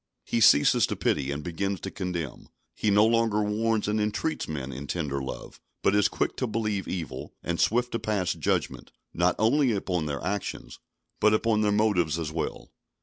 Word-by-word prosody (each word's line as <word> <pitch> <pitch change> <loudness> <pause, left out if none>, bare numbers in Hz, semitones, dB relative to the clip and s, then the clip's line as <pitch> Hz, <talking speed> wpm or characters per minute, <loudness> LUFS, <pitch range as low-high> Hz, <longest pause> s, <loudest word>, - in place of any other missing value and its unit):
He 115 - 0
ceases 75 -8 +6
to - - -3
pity, 70 -2 0
and 70 +1 -4
begins 95 +3 -2
to 95 - -5
condemn; 90 -8 -5 0.2
he 105 - -1
no 105 +1 +5
longer 115 -2 +2
warns 110 +1 0
and 105 +1 +1
entreats 105 +9 -1
men 70 -4 -4
in 70 +3 -7
tender 70 -5 -2
love, 65 - -7 0.2
but - - +3
is 105 -1 +4
quick - - -2
to 130 - -1
believe 105 -3 -2
evil, 85 -7 -5
and 85 -1 -2
swift 120 +2 +2
to 115 - -2
pass 100 -4 0
judgment, 80 -4 -2 0.2
not - - +2
only 125 +3 +3
upon 90 -5 -1
their 70 -2 -4
actions, 100 +3 -4 0.4
but 110 0 +5
upon 110 -1 +1
their 105 -1 +2
motives 100 -7 +2
as 80 -2 -3
well. 80 0 -4
100 Hz, 185 wpm, -27 LUFS, 80-110 Hz, 0.4 s, ceases